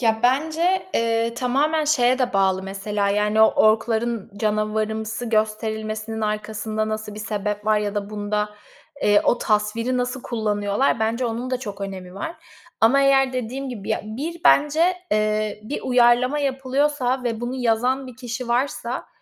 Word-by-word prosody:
Ya, 225 -2 +2
bence, 320 +9 +1
eee, 230 0 +1
tamamen 290 +6 +1
şeye 255 -4 +3
de 250 -3 0
bağlı 190 -1 +2
mesela, 200 +1 -2
yani, 210 +1 +2
o 220 - +7
ork'ların 220 0 +2
canavarımsı 215 +2 -1
gösterilmesinin 220 0 -2
arkasında 215 0 -2
nasıl 215 -1 -4
bir 215 - -7
sebep 210 -1 -3
var 215 0 +4
ya 210 0 -2
da 205 0 -3
bunda, 210 0 -2 0.5
eee, 205 0 +5
o 240 - +3
tasviri 225 +4 0
nasıl 250 +1 -2
kullanıyorlar? 210 +1 0
Bence 230 +3 0
onun 235 +2 -3
da 255 - 0
çok 205 -5 -7
önemi 185 -2 -6
var. 320 - -5 0.4
Ama 240 +5 +5
eğer 270 -1 +4
dediğim 255 +2 -4
gibi, 215 -6 -7
ya, - - 0
bir 290 +11 -5
bence, 315 +5 +4 0.2
eee, 215 0 0
bir 270 - -4
uyarlama 250 +2 +3
yapılıyorsa 270 -1 0
ve 230 -2 -2
bunu 240 +1 -3
yazan 250 +3 +1
bir 250 - -11
kişi 245 0 -5
varsa, 245 0 -1
225 Hz, 155 wpm, -22 LUFS, 215-255 Hz, 0.5 s, o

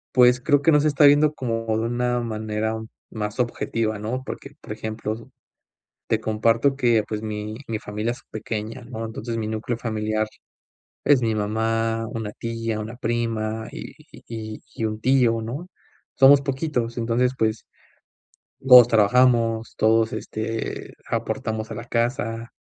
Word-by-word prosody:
pues, 125 0 +6
creo 145 +2 +3
que 165 - +4
no 150 - +6
se 155 - +2
está 145 0 +3
viendo 145 +1 +5
como 115 -4 -2
de 110 - -1
una 125 0 0
manera 110 -1 -2 0.3
más 105 0 -4
objetiva, 115 -3 -1
¿no?, 125 +5 -3
porque, 135 - -7
por - - -10
ejemplo, 110 +1 -5 0.8
te 110 - +1
comparto 115 +5 +2
que, 120 -5 +3
pues, 110 0 -4
mi 105 0 -4
mi 110 -1 -2
familia 105 +2 -3
es 120 - -8
pequeña, 110 +3 -5
¿no?, 115 -2 -6
entonces, 115 +1 -5
mi 110 - -2
núcleo 110 +2 -3
familiar 110 -1 -1 0.8
es 140 -3 +5
mi 110 -2 +1
mamá, 115 +2 0
una 110 -2 -4
tía, 115 -1 -3
una 110 +3 -7
prima 110 -2 -2
y - - -8 0.2
y - - -14
y 110 -2 -6
y - - -4
un 110 0 -2
tío, 120 -2 +3
¿no?, 135 +11 -6 0.5
somos 140 +1 +7
poquitos, 130 -4 -2
entonces, 120 +2 +1
pues, 110 0 0 0.9
todos 125 -3 +9
trabajamos, 115 0 +3
todos, 110 0 +3
este, 110 +1 -4
aportamos 110 0 -2
a 110 - -5
la 115 - -6
casa, 115 -1 -1
115 Hz, 150 wpm, -23 LUFS, 110-125 Hz, 0.9 s, todos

